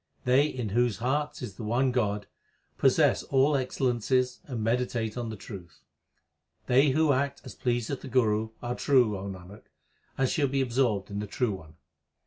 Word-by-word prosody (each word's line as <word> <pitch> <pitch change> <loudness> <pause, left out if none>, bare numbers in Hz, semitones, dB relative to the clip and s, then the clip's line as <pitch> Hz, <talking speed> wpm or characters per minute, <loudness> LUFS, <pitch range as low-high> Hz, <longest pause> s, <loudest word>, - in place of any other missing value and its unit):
They 130 +4 +4
in 125 -7 -4
whose 120 0 +1
hearts 135 +5 -1
is 105 -6 -7
the - - -6
one 125 +5 +1
God, 105 -4 0 0.5
Possess - - +4
all 140 +2 +2
excellences 125 -1 0
and 120 -6 -4
meditate 115 -1 -1
on 120 -2 -3
the 110 - -5
truth. 95 -5 -11 0.8
They 135 +4 +4
who 155 +2 +3
act 140 +1 -1
as 130 - -8
pleaseth 120 +2 -2
the - - -8
Guru 110 -4 +1
Are 120 0 -2
true, 125 -6 +3
O 95 +1 -5
Nanak, 95 +1 -10 0.5
and 135 - +2
shall 140 +2 +1
be 135 +1 -1
absorbed 120 -6 0
in 100 - -3
the 105 - -4
True 120 +3 0
One. 80 -5 -9
120 Hz, 170 wpm, -28 LUFS, 105-130 Hz, 0.8 s, They